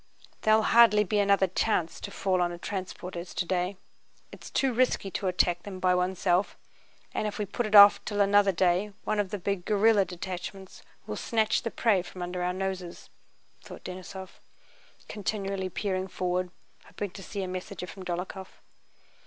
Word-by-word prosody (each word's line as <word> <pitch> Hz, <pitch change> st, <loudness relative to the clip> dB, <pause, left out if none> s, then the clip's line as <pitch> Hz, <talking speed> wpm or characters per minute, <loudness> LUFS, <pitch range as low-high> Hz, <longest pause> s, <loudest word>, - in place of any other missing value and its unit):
"There'll 215 Hz, 0 st, +4 dB
hardly 225 Hz, -3 st, +6 dB
be 210 Hz, +1 st, 0 dB
another 200 Hz, -1 st, +4 dB
such 185 Hz, -, -9 dB
chance 175 Hz, -7 st, -1 dB
to -, -, -6 dB
fall 185 Hz, -2 st, 0 dB
on 175 Hz, 0 st, +1 dB
a 175 Hz, -, -6 dB
transport 185 Hz, 0 st, -6 dB
as 175 Hz, +1 st, -7 dB
today. 180 Hz, +1 st, -1 dB, 0.5 s
It's -, -, -11 dB
too 265 Hz, -2 st, +1 dB
risky 235 Hz, -5 st, +1 dB
to 195 Hz, -, -2 dB
attack 175 Hz, -1 st, +1 dB
them 190 Hz, -1 st, -8 dB
by 185 Hz, 0 st, +3 dB
oneself, 180 Hz, +1 st, +1 dB, 0.6 s
and 215 Hz, -, -1 dB
if 210 Hz, -, -5 dB
we 210 Hz, -, -1 dB
put 230 Hz, +4 st, -3 dB
it 215 Hz, -, 0 dB
off 205 Hz, 0 st, +9 dB
till 205 Hz, -1 st, -3 dB
another 200 Hz, 0 st, +5 dB
day 185 Hz, +3 st, +1 dB
one 215 Hz, 0 st, -1 dB
of 200 Hz, -2 st, 0 dB
the 205 Hz, -, -3 dB
big 195 Hz, -1 st, -2 dB
guerrilla 210 Hz, 0 st, +4 dB
detachments 185 Hz, +1 st, -7 dB, 0.2 s
will -, -, -5 dB
snatch 220 Hz, -2 st, +1 dB
the 230 Hz, -, -3 dB
prey 220 Hz, -5 st, +2 dB
from 180 Hz, 0 st, -8 dB
under 180 Hz, 0 st, -4 dB
our 180 Hz, 0 st, 0 dB
noses," 185 Hz, -2 st, -5 dB, 0.5 s
thought -, -, -11 dB
Denísov, 185 Hz, +1 st, -8 dB, 0.7 s
continually 195 Hz, -2 st, -3 dB
peering 190 Hz, 0 st, -2 dB
forward, 180 Hz, 0 st, -2 dB, 0.4 s
hoping 205 Hz, -3 st, -6 dB
to 195 Hz, -, -10 dB
see 195 Hz, +1 st, -5 dB
a -, -, -3 dB
messenger 185 Hz, 0 st, -6 dB
from 185 Hz, +2 st, -10 dB
Dólokhov. 185 Hz, +2 st, -5 dB
190 Hz, 175 wpm, -28 LUFS, 180-205 Hz, 0.7 s, off